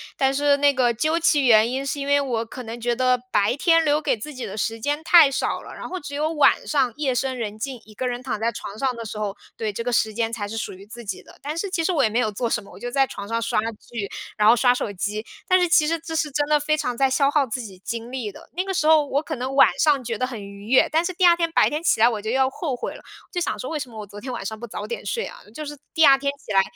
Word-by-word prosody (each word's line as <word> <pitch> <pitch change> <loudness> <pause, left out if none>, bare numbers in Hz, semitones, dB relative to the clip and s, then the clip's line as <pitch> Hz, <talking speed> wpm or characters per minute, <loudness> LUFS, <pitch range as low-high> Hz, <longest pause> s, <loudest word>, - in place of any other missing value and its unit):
但 270 0 +2
是 285 0 +3
那 285 0 +4
个 245 -2 +2
究 310 +8 0
其 295 -4 +3
原 225 -1 +6
因， 265 +2 -2
是 280 +1 -2
因 280 - -4
为 285 0 +4
我 235 -4 -2
可 250 +2 -8
能 230 +1 -7
觉 240 0 0
得 255 0 +2
白 205 0 +2
天 330 +1 +4
留 300 0 +2
给 - - +1
自 265 +8 -8
己 255 - -6
的 - - -6
时 225 +1 -2
间 290 +6 -2
太 330 -5 +7
少 270 - -2
了， - - -11
然 - - -7
后 370 - -4
只 285 -3 -7
有 305 +2 0
晚 295 -4 +3
上 265 -6 +1
夜 275 -4 0
深 260 +1 -1
人 215 -2 -5
静， 255 -1 -5
一 215 - -16
个 250 +5 -3
人 245 +1 -4
躺 235 -5 -3
在 225 +2 +1
床 205 +2 -8
上 260 -2 0
的 230 - -6
时 215 -1 -6
候， 205 -2 -3 0.2
对， 215 -2 -2
这 230 - -4
个 245 - -1
时 220 -2 +1
间 225 +1 -1
才 215 -3 -4
是 215 - -6
属 225 - -3
于 190 +2 -13
自 235 +3 -10
己 200 -3 -5
的。 - - -17
但 300 +3 -4
是 400 +3 -2
其 350 -3 -1
实 365 - +1
我 315 - +2
也 235 - +4
没 230 - 0
有 220 -3 +1
做 230 +3 -2
什 225 - -1
么， - - -15
我 - - -13
就 245 - -4
在 270 +2 +3
床 200 -5 -8
上 230 +1 -1
刷 225 -1 0 0.3
剧， 220 -5 -4 0.3
然 210 - +4
后 230 - +8
刷 245 +1 +4
手 245 - -3
机， 210 +3 -3 0.2
但 370 0 +5
是 360 - +3
其 320 -2 +4
实 330 +2 0
这 325 0 -6
是 310 -2 0
真 290 +1 0
的 300 0 +4
非 305 +1 0
常 250 -4 -2
在 270 +1 +2
消 275 +1 +3
耗 290 -1 +2
自 250 +1 -4
己 195 -5 -10
精 230 +4 -5
力 245 -5 -4
的。 - - -15
那 365 - 0
个 385 0 -3
时 310 - +1
候 315 -2 +6
我 - - +3
可 310 - -4
能 260 +1 -4
晚 275 - +8
上 290 -4 +3
觉 230 -1 -3
得 255 - 0
很 240 -4 -7
愉 200 +1 -11
悦， 255 +3 +5
但 320 +2 +2
是 360 - -2
第 365 +1 +2
2 345 -1 +7
天 335 -1 -1
白 - - +4
天 300 +2 -3
起 320 - +2
来 230 - +7
我 225 -4 -1
就 215 - -4 0.2
后 285 -4 -3
悔 245 - -5
了， - - -12 0.3
就 355 - -2
想 - - -1
说 255 - -5
为 320 - -2
什 270 -3 -5
么 225 -2 -10
我 210 - -6
昨 205 +1 -11
天 255 - -5
晚 235 -5 -5
上 220 +1 -5
不 240 - -7
早 - - -6
点 475 - -5
睡 465 - -2
啊， - - -10 0.2
就 305 - -5
是 295 0 -7 0.2
第 320 -1 +5
2 275 -1 +7
天 280 0 0
起 - - -7
来， 195 - +6
255 Hz, 335 characters per minute, -23 LUFS, 225-295 Hz, 0.3 s, 后